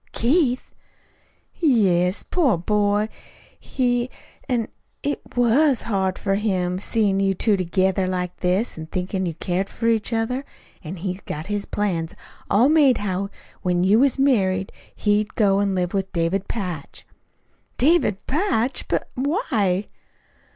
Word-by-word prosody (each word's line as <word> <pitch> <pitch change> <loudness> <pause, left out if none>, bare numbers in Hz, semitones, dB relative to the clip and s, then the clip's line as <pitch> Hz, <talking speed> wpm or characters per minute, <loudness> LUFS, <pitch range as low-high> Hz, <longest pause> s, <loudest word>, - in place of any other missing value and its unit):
"Keith!" 255 0 +1 0.9
"Yes 195 - +3
poor 285 - +2
boy, 205 +3 +1 0.5
he 245 -1 0 0.4
an' 235 -3 0 0.4
it 290 - -1
WAS 245 +3 +3
hard 190 -4 0
for 195 - -1
him, 185 -3 0
seein' 205 -2 +1
you 195 -1 +2
two 210 +2 +2
together 185 +1 +1
like 180 -1 -2
this, 185 +1 0
an' 160 - -7
thinkin' 185 +2 -2
you 165 - -4
cared 185 +3 -2
for 230 - -6
each 225 -1 +2
other. 235 +4 -1 0.4
An' 165 +3 -6
he'd 185 +2 -4
got 155 +1 -5
his 205 0 -3
plans 175 -6 -2 0.3
all 225 +6 +5
made 290 -5 +5
how 195 -1 -2 0.3
when 180 -1 +1
you 200 +4 +5
was 275 0 +3
married 195 -9 +2 0.2
he'd 210 0 0
go 200 -3 +3
an' 200 -1 +1
live 180 -1 -1
with 195 -1 -1
David 170 +3 0
Patch." 180 -10 -5 0.7
"David 255 - +2
Patch! 275 - 0
But - - -1
why?" 235 - 0
205 Hz, 135 wpm, -23 LUFS, 185-240 Hz, 0.9 s, all